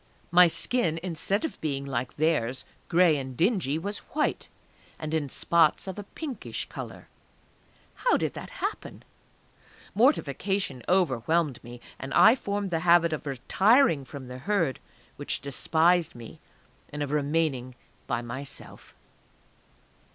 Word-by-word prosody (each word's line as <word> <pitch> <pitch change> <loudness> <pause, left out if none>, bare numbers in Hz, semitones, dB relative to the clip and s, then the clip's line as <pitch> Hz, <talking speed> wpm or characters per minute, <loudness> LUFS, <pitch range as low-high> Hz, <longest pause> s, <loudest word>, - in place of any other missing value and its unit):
_ - - -35 0.3
My 180 +1 +8
skin 170 -2 0
instead 190 - -1
of 320 - -6
being 140 -3 -2
like 125 -2 -3
theirs, 140 -5 0 0.2
gray 170 -3 +4
and 130 -2 -6
dingy, 175 - +1
was 200 +5 -4 0.2
white, 300 - 0 0.5
and 155 0 -5
in 150 -3 0
spots 165 +5 +2
of 190 +1 -5
a - - -5
pinkish 260 +1 -6
colour.... - - -8 0.9
How - - +2
did - - -2
that - - -8 0.2
happen? - - -5 0.9
Mortification 195 - +1
overwhelmed 160 -4 +1
me. 120 0 -11 0.2
And 135 - -5
I 230 - +8
formed 200 -5 -3
the 165 - +1
habit 170 -1 +4
of 150 -1 -5
retiring 165 - +3
from 135 -1 -9
the 125 0 -8
Herd 165 - 0 0.4
which - - -2
despised 160 +4 +1
me, 115 -2 -11 0.5
and 150 0 -3
of 145 - -4
remaining 145 -4 0 0.3
by 120 - -1
myself. 130 +4 -8
160 Hz, 135 wpm, -27 LUFS, 135-190 Hz, 0.9 s, My